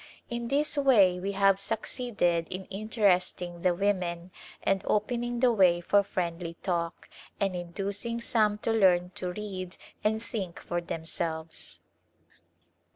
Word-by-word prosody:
In 235 0 -3
this 290 +3 +1
way 205 -10 +5
we 195 +2 -2
have 195 0 +4
succeeded 205 -7 0
in 185 +1 -5
interesting 190 -4 +1
the 180 -1 +3
women 180 -2 -1 0.3
and 195 -1 +2
opening 240 +3 0
the 250 -2 +5
way 180 -5 +5
for 200 +4 +3
friendly 170 -3 -3
talk, 170 -2 -2 0.3
and 195 -2 0
inducing 200 +6 -3
some 215 -3 +2
to 230 - +2
learn 180 -4 +4
to 180 -1 -4
read 185 -2 -6 0.3
and 220 +1 +1
think 195 -8 -5
for 175 0 -3
themselves. 160 -1 -4
195 Hz, 130 wpm, -29 LUFS, 175-215 Hz, 0.3 s, way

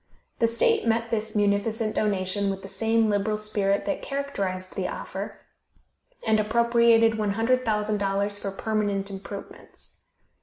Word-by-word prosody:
The 230 - +4
state 330 - +2
met 230 0 +1
this 220 -1 -2
munificent 210 +2 +1
donation 200 -1 0
with 195 0 -4
the - - -6
same 225 +2 +1
liberal 210 +1 +1
spirit 205 -2 0
that 295 - -2
characterized 195 -10 -3
the - - -1
offer, - - -6 0.9
and 220 -1 +3
appropriated 230 0 +4
$100,000 210 -2 +1
for 200 - -2
permanent 200 -1 -1
improvements. 195 +1 -7
215 Hz, 120 wpm, -26 LUFS, 200-225 Hz, 0.9 s, The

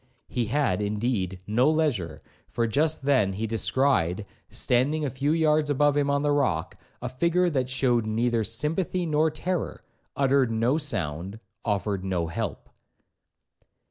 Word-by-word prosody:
He 120 - -1
had, 125 -7 0
indeed, 105 -3 -2
no 120 +8 +3
leisure, 115 - -1 0.3
for 115 - 0
just 150 +7 +1
then 130 -9 +2
he 105 +4 -3
descried, 110 -4 +1 0.2
standing 145 +5 +1
a 135 - -2
few 140 +4 0
yards 155 -2 +2
above 145 0 +3
him 145 -1 +1
on 140 0 +1
the 145 - +2
rock, 90 - 0 0.3
a - - -1
figure 170 +7 +1
that 130 -4 -1
shewed 125 -4 +1
neither 115 +1 +1
sympathy 165 - -1
or 155 +2 +3
terror,—uttered 140 -5 -1
no 115 +6 +1
sound,—offered 100 - -3
no 90 -3 -1
help. 85 - -4
130 Hz, 135 wpm, -26 LUFS, 105-150 Hz, 0.3 s, no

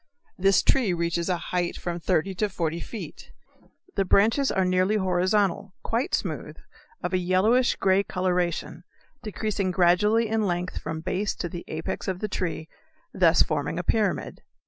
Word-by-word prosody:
This 195 +1 +3
tree 235 -9 +3
reaches 170 +1 -1
a 180 - +1
height 175 0 -2
of - - -13
from 175 -1 -3
thirty 170 +3 0
to 210 +3 -1
forty 170 -3 -2
feet. 220 +5 -8 0.6
The - - +2
branches 225 +9 +3
are 190 -1 +1
nearly 185 +3 +2
horizontal, 190 0 +1
quite 235 +4 0
smooth, - - -5 0.5
of - - -2
a 185 - +3
yellowish 200 +8 +3
grey 190 0 +3
coloration, 180 -3 -2 0.4
decreasing 210 -3 -2
gradually 190 +6 +3
in 220 -1 0
length 175 0 -2
from 160 0 -5
base 185 +4 -2
to 175 - -4
the 175 +1 -7
apex 160 +5 -4
of 190 -2 -1
the 215 - -3
tree, 170 -5 -3 0.5
thus - - +5
forming - - -2
a - - -2
pyramid. - - 0
185 Hz, 160 wpm, -26 LUFS, 175-210 Hz, 0.6 s, thus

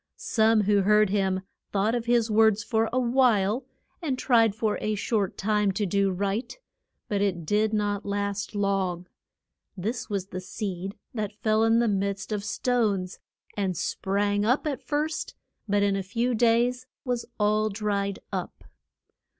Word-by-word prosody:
Some 225 - +3
who 205 0 +3
heard 210 0 +4
him 190 -2 +1 0.3
thought 205 +3 +1
of 240 -1 -1
his 235 -2 +2
words 220 -1 +4
for 225 0 +1
a 255 - -1
while, 240 -2 +2 0.4
and 280 -6 -1
tried 230 -5 +3
for 215 -1 -1
a 215 0 0
short 205 -1 -1
time 210 0 +1
to 205 +2 -1
do 200 +1 +2
right. 200 - -2 0.5
But 205 -1 -1
it 180 -5 0
did 210 +5 +2
not 205 -1 0
last 200 0 -3
long. 195 -3 0 0.7
This 225 +7 -3
was 195 -2 -3
the 185 - -5
seed 195 0 -5 0.2
that 210 -3 -4
fell 215 0 +3
in 225 0 +4
the 235 0 +3
midst 200 0 -1
of 210 -1 -2
stones, 210 -5 0 0.4
and 190 -4 -1
sprang 205 +3 0
up 250 +8 +2
at 285 -2 -2
first, 300 +4 -2 0.3
but 205 0 +3
in 200 -1 +2
a 195 - -1
few 230 +6 -1
days 240 +2 +2 0.2
was 245 -2 -2
all 215 +1 +2
dried 200 -1 -1
up. - - -5
210 Hz, 160 wpm, -26 LUFS, 200-230 Hz, 0.7 s, heard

